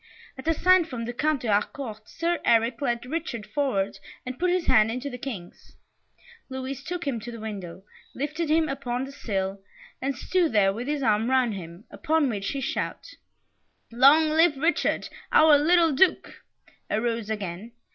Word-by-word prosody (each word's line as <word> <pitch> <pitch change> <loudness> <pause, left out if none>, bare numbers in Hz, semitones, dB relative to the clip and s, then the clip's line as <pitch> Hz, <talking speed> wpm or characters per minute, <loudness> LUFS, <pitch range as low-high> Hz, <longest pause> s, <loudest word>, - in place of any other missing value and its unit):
At 265 +3 -10
a 325 - +3
sign 370 0 +4
from 245 -7 -5
the 240 - -4
Count 300 +2 0
de - - -3
Harcourt, 215 +1 -2
Sir 340 0 -1
Eric 230 +2 +2
led 240 -3 -1
Richard 255 -7 -4
forward, 205 -5 -1 0.3
and 255 0 -6
put 360 +1 +2
his 355 -1 +1
hand 215 0 +4
into 255 +4 -4
the 250 - -6
King's. 220 -10 -8 0.7
Louis 265 0 -5
took 350 +2 -5
him 265 -5 -1
to 240 +2 -8
the 230 - -8
window, 195 -4 -7 0.3
lifted 300 +4 -3
him 315 0 +3
upon 260 -3 -3
the 270 - -7
sill, 195 -7 -3 0.4
and 270 -1 -2
stood 345 0 0
there 195 -2 +4
with 235 +5 -5
his 295 -1 -1
arm 220 +1 +2
round 255 -4 +2
him, 175 0 -9
upon 320 -4 +1
which 200 -4 -3
the 275 - -3
shout, 270 - -3 0.8
"Long 280 +7 +6
live 320 -1 +4
Richard, 325 +5 0 0.2
our 310 -1 +7
little 335 +2 +4
Duke!" 360 +7 +1 0.5
arose 230 0 -1
again. 205 +1 -5
255 Hz, 170 wpm, -26 LUFS, 220-310 Hz, 0.8 s, our